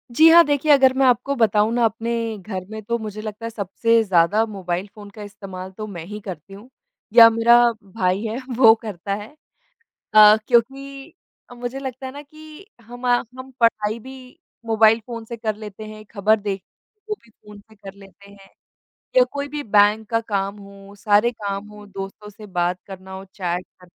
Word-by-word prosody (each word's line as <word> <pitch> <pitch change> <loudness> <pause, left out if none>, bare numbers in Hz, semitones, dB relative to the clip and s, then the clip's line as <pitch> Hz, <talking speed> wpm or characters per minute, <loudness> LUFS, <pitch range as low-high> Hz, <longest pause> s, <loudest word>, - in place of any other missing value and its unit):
जी 320 - +7
हाँ। 340 +1 +8
देखिए, 290 +1 +1
अगर 270 -2 +6
मैं 270 - +3
आपको 255 +3 +2
बताऊँ 215 -2 +2
ना 240 -1 +2
अपने 230 +1 -2 0.3
घर 185 -1 -7
में 220 0 -7
तो 235 +3 -2
मुझे 215 -1 -7
लगता 215 +1 -7
है - - -3
सबसे 225 +2 +1
ज़्यादा 195 +3 +2
मोबाइल 190 -3 -4
फ़ोन 205 -1 -11
का 210 - -8
इस्तेमाल 190 -2 -9
तो 215 -1 -6
मैं 175 -5 -8
ही 210 +2 -8
करती 185 -1 -8
हूँ। 210 +6 -13 0.4
या 230 -1 +10
मेरा 230 +1 +4 0.3
भाई 190 -1 -1
है 220 +1 -3 0.2
वो 225 -3 +8
करता 200 -3 -5
है। 205 +1 -8 0.9
अ, 215 0 +9
क्योंकि 275 +5 -1 0.4
मुझे 245 +2 -6
लगता 265 -1 -6
है 260 - -7
ना 285 +1 -9
कि 310 +4 -15 0.2
हमा 245 +2 -1 0.2
हम 260 +1 -9
पढ़ाई 215 -1 +1
भी 260 +3 -13 0.3
मोबाइल 225 0 +4
फ़ोन 230 -2 -7
से 235 +1 -8
कर 220 -1 -3
लेते 215 0 -9
हैं, 215 0 -11
खबर 215 0 +1
देख 200 -2 -4 0.5
वो 425 - -1
भी 230 - -22
फ़ोन 210 -1 -16
से 220 +2 -22
कर 195 -1 -11
लेते 200 0 -17
हैं। 195 -1 -17 0.7
या - - +7
कोई 285 0 -4
भी 295 +1 -5
बैंक 210 -1 +3
का 230 -1 +1
काम 200 -2 -3
हो, 200 0 -14
सारे 210 +2 +3
काम 200 -2 -5
हो 210 0 -13
दोस्तों 195 +1 -8
से 210 +1 -13
बात 180 -1 -1
करना 190 -1 -11
हो, 190 0 -8
चैट 180 -2 -4 0.2
कर 180 - -17
215 Hz, 190 wpm, -21 LUFS, 200-235 Hz, 0.9 s, या